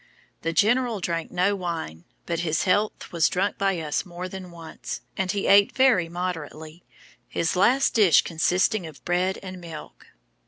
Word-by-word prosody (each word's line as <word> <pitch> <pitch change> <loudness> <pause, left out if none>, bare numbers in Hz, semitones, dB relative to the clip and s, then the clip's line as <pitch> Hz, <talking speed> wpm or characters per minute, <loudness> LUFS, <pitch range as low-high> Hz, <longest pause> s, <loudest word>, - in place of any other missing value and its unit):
The 165 - -1
General 230 +4 +2
drank 170 -2 -3
no 190 +3 +1
wine, 165 - -5 0.2
but 170 -1 -2
his 160 -2 0
health 205 +3 0
was 165 -4 +2
drunk 195 +2 -1
by 195 -3 +1
us 150 -2 -2
more 180 -1 -7
than 185 -1 -8
once; 165 -2 -8
and 190 -1 -1
he 200 -1 -2
ate 200 0 +5
very 245 -11 +4
moderately; 165 -2 -6 0.4
his 165 - -1
last 250 +9 +3
dish 180 - +5
consisting 180 +3 +1
of 155 -3 -14
bread 180 +2 0
and 185 -1 -8
milk." 165 -3 -10
180 Hz, 160 wpm, -25 LUFS, 165-195 Hz, 0.4 s, ate